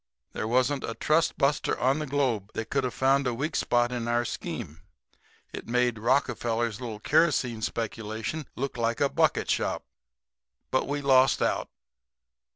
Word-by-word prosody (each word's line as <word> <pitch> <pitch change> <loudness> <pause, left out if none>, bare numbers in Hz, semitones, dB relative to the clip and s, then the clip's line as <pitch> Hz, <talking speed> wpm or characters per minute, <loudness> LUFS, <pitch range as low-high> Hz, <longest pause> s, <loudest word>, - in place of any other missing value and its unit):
There 110 - -3
wasn't 130 +4 +1
a 115 - -4
trust 155 +2 +1
buster 140 0 +1
on 135 +4 +2
the 150 - -3
globe 130 -8 0
that 110 0 -4
could 135 -1 +1
have 125 - -3
found 135 0 +3
a 120 - -1
weak 150 +6 -3
spot 120 0 +2
in 120 -2 -3
our 120 0 +1
scheme. 75 -7 -6 0.7
It - - -7
made 120 -1 +1
Rockefeller's 120 -2 0
little 115 -4 -5
kerosene 130 -5 +2
speculation 110 +7 -4
look 135 0 -3
like 115 0 0
a 140 - +3
bucket - - +1
shop. - - -1 0.9
But 130 - +1
we 145 0 -2
lost 135 -1 +5
out." - - 0
125 Hz, 160 wpm, -27 LUFS, 115-140 Hz, 0.9 s, lost